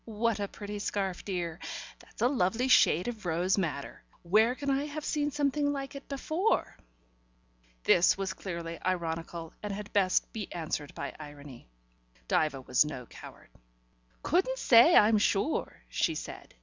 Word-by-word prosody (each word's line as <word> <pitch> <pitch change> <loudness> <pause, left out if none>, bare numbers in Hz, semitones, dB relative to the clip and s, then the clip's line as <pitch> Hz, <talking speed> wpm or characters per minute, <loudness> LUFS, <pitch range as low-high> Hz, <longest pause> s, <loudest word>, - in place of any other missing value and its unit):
"What 225 0 -1
a 200 - -1
pretty 205 +1 -7
scarf, 195 -3 -2
dear! 175 -3 -3 0.4
That's - - -8
a - - +6
lovely 240 -1 +1
shade 180 -8 +5
of 230 -3 -5
rose 175 +2 +1
madder. 150 -6 -4 0.2
Where 215 +7 +3
can 280 0 -2
I 275 +2 0
have 300 +1 -6
seen 295 -1 0
something 290 0 0
like 275 -1 -4
it 275 0 -10
before?" 315 +9 0 1.1
This 175 +2 +5
was 195 -1 -2
clearly 170 -3 -6
ironical, 165 -2 -3
and 210 - -4
had 205 +1 -7
best 190 -3 +2
be 215 -3 -5
answered 155 -3 -4
by - - -5
irony. 145 - -11 0.6
Diva 150 -4 +1
was 125 +1 +3
no 145 -5 -6
coward. - - -13 0.7
"Couldn't 440 +10 +1
say, 250 - +7
I'm 215 0 +6
sure," 205 +8 0
she - - 0
said. - - -8
200 Hz, 150 wpm, -30 LUFS, 170-260 Hz, 1.1 s, say